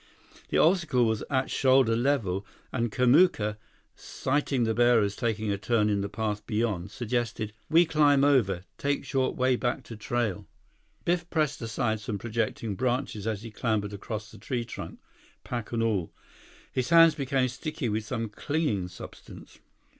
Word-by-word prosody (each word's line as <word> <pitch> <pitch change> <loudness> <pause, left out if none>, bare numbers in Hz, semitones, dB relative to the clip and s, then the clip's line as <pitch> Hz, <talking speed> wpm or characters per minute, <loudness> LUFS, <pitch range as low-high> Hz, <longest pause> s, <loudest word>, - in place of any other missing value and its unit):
The - - +1
obstacle 160 -8 +3
was 110 -2 0
at 130 -1 0
shoulder 130 -4 +4
level, 115 -7 0 0.3
and 120 -3 -1
Kamuka, 125 - +3 0.4
sighting 135 -2 -1
the 110 -1 +1
bearers 115 -3 +3
taking 110 -3 -1
a 100 - -2
turn 105 -1 +2
in 100 -1 +1
the 100 - -3
path 105 -1 -3
beyond, 105 -5 -1
suggested: 115 -2 -2 0.2
"We 165 +3 +6
climb 145 -3 +4
over. 110 -11 +3 0.2
Take 140 0 -1
short 130 0 0
way 130 0 +2
back 120 0 -1
to 115 - -9
trail." 110 -2 -2 0.6
Biff 175 0 0
pressed 155 -5 0
aside 110 -1 -1
some 105 0 -4
projecting 115 -1 -2
branches 125 -3 -1
as 110 -2 -2
he 115 - -8
clambered 105 -2 -1
across 105 +1 -6
the - - -13
tree 125 -4 -3
trunk, 115 - -8 0.5
pack 120 -3 -5
and 115 -1 0
all. 100 -7 0 0.6
His 130 -1 -1
hands 165 -1 +7
became 135 -3 0
sticky 130 +2 -4
with 110 +1 -1
some 115 +1 -3
clinging 110 - -1
substance. 90 - -12
120 Hz, 155 wpm, -28 LUFS, 105-135 Hz, 0.6 s, hands